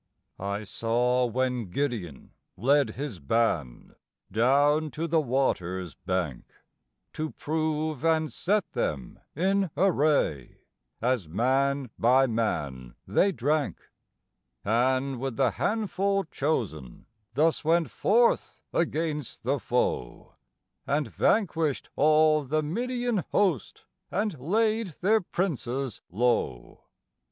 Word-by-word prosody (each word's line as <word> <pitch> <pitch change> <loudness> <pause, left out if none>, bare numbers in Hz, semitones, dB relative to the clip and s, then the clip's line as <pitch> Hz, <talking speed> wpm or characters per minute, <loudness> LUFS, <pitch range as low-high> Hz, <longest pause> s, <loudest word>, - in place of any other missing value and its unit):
I 100 +2 -3
saw 125 +4 +1
when 125 -3 -1
Gideon 105 - -3 0.3
led 135 +1 +2
his 135 -8 -5
band 75 - -1 0.4
down 145 +8 +3
to 155 +5 -4
the 165 -1 +2
water's 95 - -1
bank 90 -9 -3 0.7
To 155 0 -3
prove 155 -2 -2
and 160 -1 +2
set 205 +1 0
them 75 - -3 0.2
in 190 +3 +1
array, 150 - +1 0.5
as 125 -8 +1
man 130 - +1
by 130 +3 +5
man 70 - -2
they 200 - +3
drank, 150 -1 -1 0.7
And 130 +4 +1
with 135 -2 -3
the 130 -4 +3
handful 200 - 0
chosen 115 - -3 0.3
thus 160 +3 +2
went 165 +1 +2
forth 235 +3 +2
against 155 -4 -2
the 135 +4 0
foe, 120 - -2 0.5
And 140 -2 0
vanquished 165 - +1
all 155 0 +4
the 155 +3 0
Midian 240 +7 -1
host, 185 - 0 0.2
and 205 -8 -2
laid 215 - 0
their 215 +4 +4
princes 140 - -3
low. 105 - -1
140 Hz, 105 wpm, -27 LUFS, 115-160 Hz, 0.7 s, by